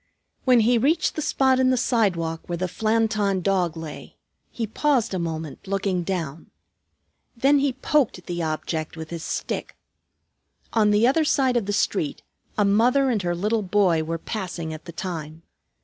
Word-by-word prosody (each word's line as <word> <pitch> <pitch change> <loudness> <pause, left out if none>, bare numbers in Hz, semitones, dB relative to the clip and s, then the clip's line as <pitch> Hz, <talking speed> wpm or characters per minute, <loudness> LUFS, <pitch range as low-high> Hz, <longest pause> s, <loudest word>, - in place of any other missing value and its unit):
When 250 -3 +6
he 235 +2 +3
reached 310 +7 +2
the 310 - -2
spot 265 -3 +2
in 260 0 +4
the 255 - +2
sidewalk 180 -11 0
where 175 - -2
the 185 - -1
Flanton 215 -1 +1
Dog 180 -4 +1
lay, 160 -2 -8 0.3
he 230 - -3
paused 250 0 +1
a 185 - -1
moment 160 +1 -5
looking 195 -2 0
down. 165 -4 -4 0.9
Then 280 +4 +4
he 275 -1 +1
poked 260 - 0
the 175 -1 -3
object 155 0 -3
with 160 0 -7
his 165 -1 -5
stick. - - -4 1.0
On 215 -2 +4
the 210 +2 +4
other 280 +6 +3
side 265 -4 +2
of 230 -5 0
the - - 0
street 195 -6 -1 0.3
a 210 - +3
mother 245 +7 +3
and 215 -4 0
her 175 -1 -1
little 210 +5 0
boy 185 -4 +2
were 165 +1 -3
passing 170 -4 -5
at 155 0 -9
the - - -7
time. 165 -2 -6
200 Hz, 170 wpm, -24 LUFS, 170-240 Hz, 1.0 s, When